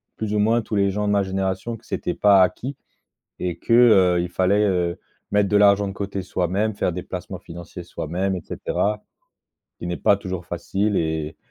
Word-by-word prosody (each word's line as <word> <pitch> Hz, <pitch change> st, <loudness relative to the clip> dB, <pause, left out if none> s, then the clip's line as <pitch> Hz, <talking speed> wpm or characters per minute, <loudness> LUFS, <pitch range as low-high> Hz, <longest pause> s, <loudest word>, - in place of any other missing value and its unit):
plus 110 Hz, -1 st, -3 dB
ou 105 Hz, -, +1 dB
moins, 115 Hz, +3 st, +3 dB
tous 110 Hz, -, -5 dB
les 100 Hz, -1 st, +3 dB
gens 105 Hz, +1 st, -1 dB
de -, -, +2 dB
ma 100 Hz, -1 st, +3 dB
génération 95 Hz, +4 st, -2 dB
que 115 Hz, -, -16 dB
c'était -, -, -3 dB
pas 100 Hz, -2 st, +5 dB
acquis 125 Hz, +9 st, 0 dB, 0.6 s
et 90 Hz, -2 st, -2 dB
que, -, -, -3 dB
heu, 100 Hz, -7 st, +6 dB
il 90 Hz, -, -2 dB
fallait, 100 Hz, +4 st, +2 dB
heu, 90 Hz, -3 st, 0 dB, 0.3 s
mettre 105 Hz, -1 st, +2 dB
de 105 Hz, -, +2 dB
l'argent 100 Hz, 0 st, +5 dB
de -, -, -5 dB
côté 100 Hz, -1 st, -4 dB
soi-même, 95 Hz, +4 st, -1 dB
faire 90 Hz, -, -1 dB
des 90 Hz, +2 st, -5 dB
placements -, -, -6 dB
financiers 85 Hz, +1 st, -10 dB
soi-même, 90 Hz, +4 st, -2 dB
et 90 Hz, -, -6 dB
cetera, 105 Hz, +1 st, -2 dB, 0.8 s
qui -, -, -6 dB
n'est 90 Hz, 0 st, -2 dB
pas 100 Hz, -, +4 dB
toujours 95 Hz, -3 st, -6 dB
facile 100 Hz, +4 st, -1 dB
e 80 Hz, -1 st, -1 dB
t -, -, -35 dB
95 Hz, 205 wpm, -23 LUFS, 90-105 Hz, 0.8 s, heu